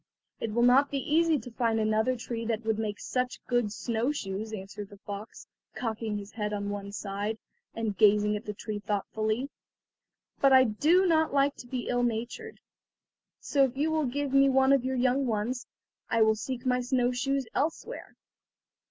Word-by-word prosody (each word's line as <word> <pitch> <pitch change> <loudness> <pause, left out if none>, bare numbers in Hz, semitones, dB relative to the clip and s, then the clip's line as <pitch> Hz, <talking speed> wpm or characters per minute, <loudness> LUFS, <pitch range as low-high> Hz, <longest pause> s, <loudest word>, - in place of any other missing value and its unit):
"It 225 - -2
will 235 +2 +2
not 260 +4 +5
be 280 - -2
easy 315 +3 +2
to 245 -1 -8
find 230 -1 0
another 220 +3 +2
tree 230 -1 -5
that 225 -1 -2
would 220 -1 0
make 210 -2 -3
such 250 0 -2
good 240 -4 +1
snow 235 +4 -1
shoes," 215 -5 -4
answered 200 0 -7
the 205 - -13
fox, 205 +2 -8 0.3
cocking 220 -3 -3
his 200 0 -8
head 210 -1 -3
on 205 0 -2
one 200 0 -5
side, 205 +2 -3 0.4
and 225 -3 -2
gazing 210 0 +4
at 210 - -6
the 210 - -4
tree 210 0 -5
thoughtfully; 215 +5 -2 0.9
"but 275 - +5
I 260 0 +8
do 305 - +3
not 320 -4 +2
like 280 +1 +3
to 245 - -10
be 250 -1 -4
ill 245 0 +1
natured, 240 - -3 0.8
so 280 -2 +2
if 265 -1 0
you 305 +3 +1
will 310 -3 +1
give 280 +2 -2
me 275 0 +6
one 265 +1 +4
of 275 -3 +3
your 260 0 -1
young 255 +2 +2
ones 230 +3 -2 0.4
I 230 -1 +4
will 220 0 +4
seek 255 +3 -5
my 250 0 +2
snow 250 0 +1
shoes 270 +2 -1
elsewhere." 315 +4 -3
240 Hz, 185 wpm, -29 LUFS, 215-265 Hz, 0.9 s, I